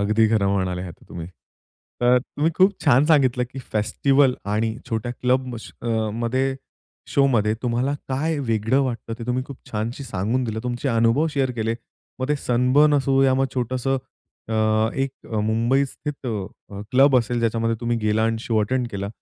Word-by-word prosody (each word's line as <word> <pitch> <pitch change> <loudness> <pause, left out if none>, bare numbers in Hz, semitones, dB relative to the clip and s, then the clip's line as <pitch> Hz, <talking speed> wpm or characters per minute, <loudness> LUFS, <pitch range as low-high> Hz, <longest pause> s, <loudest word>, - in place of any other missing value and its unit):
अगदी 110 +2 +3
खरं 105 -3 +2
म्हणाले 95 -2 -1
आहेत 90 -3 -7
तुम्ही. 85 -1 -7 0.7
तर 125 +1 +5
तुम्ही 145 +5 -1
खूप 190 +2 +5
छान 135 -1 +5
सांगितलं 130 -6 +3
की 135 - -7
फेस्टिव्हल 130 +5 +2 0.2
आणि 110 +1 0
छोट्या 115 +2 -2
क्लब 125 0 0
श - - -11
अ, 120 - -5 0.3
मध्ये 130 +4 0 0.6
शोमध्ये 120 -7 +3
तुम्हाला 125 +3 0 0.2
काय 150 +4 -1
वेगळं 115 0 +1
वाटतं 120 -3 -3
ते 115 - -6
तुम्ही 125 +1 0
खूप 140 - -9
छानशी 115 +6 -3
सांगून 115 +2 -1
दिलं. 110 -1 -3
तुमचे 125 +2 -2
अनुभव 115 +5 +3
शेअर 135 -3 0
केले. 115 -1 -1 0.4
मग 130 +1 -2
ते 150 - +2
सनबर्न 130 +4 +3
असो 135 -1 +3
या 130 -1 +4
मग 135 +1 +2
छोटंसं 130 +1 -1 0.5
अ, 110 - -2 0.4
1 135 0 -4 0.2
मुंबईस्थित 130 +6 -1
अ, 100 -2 -6
क्लब 135 +1 +6
असेल 120 0 +1
ज्याच्यामध्ये 115 0 0
तुम्ही 120 0 0
गेला 105 0 +1
आणि 115 0 0
शो 115 -1 0
अटेंड 125 +4 0
केला. 100 0 -4
120 Hz, 165 wpm, -23 LUFS, 110-135 Hz, 0.7 s, क्लब